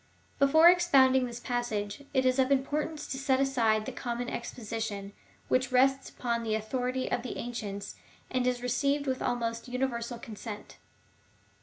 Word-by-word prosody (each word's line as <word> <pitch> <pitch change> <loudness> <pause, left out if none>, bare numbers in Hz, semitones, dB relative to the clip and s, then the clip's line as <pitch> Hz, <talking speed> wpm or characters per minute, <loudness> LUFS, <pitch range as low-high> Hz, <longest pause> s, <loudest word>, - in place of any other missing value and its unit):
Before 315 +4 +7
ex 355 0 +5
pounding 260 -4 +5
this 240 0 -7
passage, 240 -1 -3
it 260 -2 +2
is 255 +1 +3
of 265 +1 +3
importance 295 +3 0
to 265 - -4
set 270 -1 +2
aside 230 -6 +2
the - - -4
common 240 0 -4
exposition, 220 -4 -5 0.3
which 255 0 +1
rests 270 +1 +3
upon 235 -2 -2
the 220 -2 -1
authority 250 +4 -2
of - - 0
the 250 - -6
ancients, 205 -4 -5 0.4
and 255 -1 +1
is 245 -1 0
received 280 +4 +1
with 260 -2 -1
almost 230 -1 -2
universal 245 -2 -2
consent. 220 -3 -8
250 Hz, 155 wpm, -30 LUFS, 230-265 Hz, 0.4 s, Before